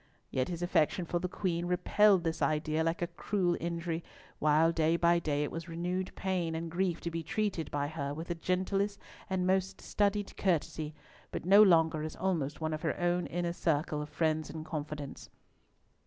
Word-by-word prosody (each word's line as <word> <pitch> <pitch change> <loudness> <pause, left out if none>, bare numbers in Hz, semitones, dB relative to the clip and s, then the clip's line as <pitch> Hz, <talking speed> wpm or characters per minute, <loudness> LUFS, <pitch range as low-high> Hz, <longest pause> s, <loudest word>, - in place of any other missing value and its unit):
Yet 130 - 0
his 175 -1 -4
affection 175 0 +2
for 175 +1 -1
the 180 - -2
Queen 175 -2 -1
repelled 185 +1 +4
this 165 -1 -2
idea 155 +1 +1
like 165 +1 0
a 170 - -4
cruel 185 -4 +1
injury, 170 0 -3 0.4
while, 155 +2 +4
day 165 0 +2
by 170 0 +4
day, 150 -3 0
it 150 - -3
was 165 +1 -6
renewed 180 +3 -3
pain 180 -4 -1
and 165 0 -4
grief 175 -1 0
to 170 - -3
be 165 0 -2
treated 185 0 -2
by 145 0 -1
her 145 -2 -4
with 160 +4 -6
the - - +1
gentlest 190 +4 -1 0.3
and 185 -1 0
most 190 +1 +1
studied 205 -1 0
courtesy, 155 -4 -1 0.3
but - - -5
no 200 +3 +8
longer 165 -5 +5
as 155 0 -5
almost 155 -7 -1
one 160 -1 -1
of 155 - -3
her 155 - -1
own 175 0 +1
inner 175 0 -2
circle 155 -2 0
of 150 - -6
friends 155 +1 0
and 155 -1 -6
confidants. 150 -3 -6
170 Hz, 185 wpm, -32 LUFS, 155-180 Hz, 0.4 s, no